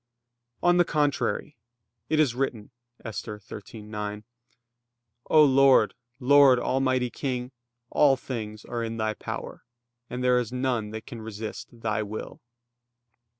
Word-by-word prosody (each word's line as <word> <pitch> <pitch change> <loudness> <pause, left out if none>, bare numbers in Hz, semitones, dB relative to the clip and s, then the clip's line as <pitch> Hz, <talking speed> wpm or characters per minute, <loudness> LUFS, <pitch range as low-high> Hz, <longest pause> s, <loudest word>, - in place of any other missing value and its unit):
On 175 0 +5
the 175 - +6
contrary, 150 -1 0 0.5
It 155 - +2
is 145 -6 +3
written 120 -5 -3 0.3
(Esther 105 0 -5
13:9): 105 0 -7 1.1
"O 155 -1 +7
Lord, 135 -5 +5 0.3
Lord, 140 0 +6
almighty 130 -1 +1
King, 125 -1 -3 0.4
all 140 -2 +5
things 110 -5 -6
are 120 -1 -3
in 115 0 -4
Thy 110 -1 0
power, - - -7 0.5
and 125 +1 -4
there 125 0 +4
is 120 -2 -3
none 125 -4 -1
that 110 +1 -7
can 120 -4 -8
resist 110 0 -6
Thy 115 -2 -2
will." 110 +1 -6
125 Hz, 125 wpm, -27 LUFS, 110-135 Hz, 1.1 s, O